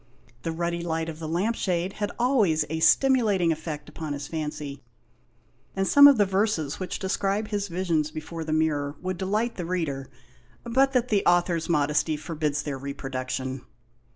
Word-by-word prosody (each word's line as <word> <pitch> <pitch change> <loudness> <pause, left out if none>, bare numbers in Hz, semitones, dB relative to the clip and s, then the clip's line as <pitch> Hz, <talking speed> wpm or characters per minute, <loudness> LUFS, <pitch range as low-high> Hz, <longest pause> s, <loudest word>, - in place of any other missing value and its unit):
The 165 - -3
ruddy 170 +1 -2
light 165 -1 -2
of 160 -1 -7
the 160 - -5
lamp 185 +8 0
shade 180 -1 -1
had 205 - 0
always 215 - +2
a 160 - -1
stimulating 210 -5 +4
effect 155 -2 -5
upon 150 -1 -5
his 140 -1 -5
fancy, 150 -3 -5 0.9
and 195 0 0
some 285 0 +9
of 280 -3 +6
the 205 - +4
verses 190 -7 0
which 185 - -3
describe 200 +2 -1
his 205 -1 -2
visions 170 -4 0
before 160 +2 -6
the 160 - -4
mirror 150 -2 0
would 185 -1 -4
delight 215 +5 -1
the 180 - -3
reader, 150 -7 -2 0.5
but 265 +3 +2
that 250 -1 +1
the 205 -2 +2
author's 175 -1 +2
modesty 150 0 +1
forbids 150 -2 -2
their 140 -3 -4
reproduction. 130 -1 -4
170 Hz, 165 wpm, -26 LUFS, 150-195 Hz, 0.9 s, some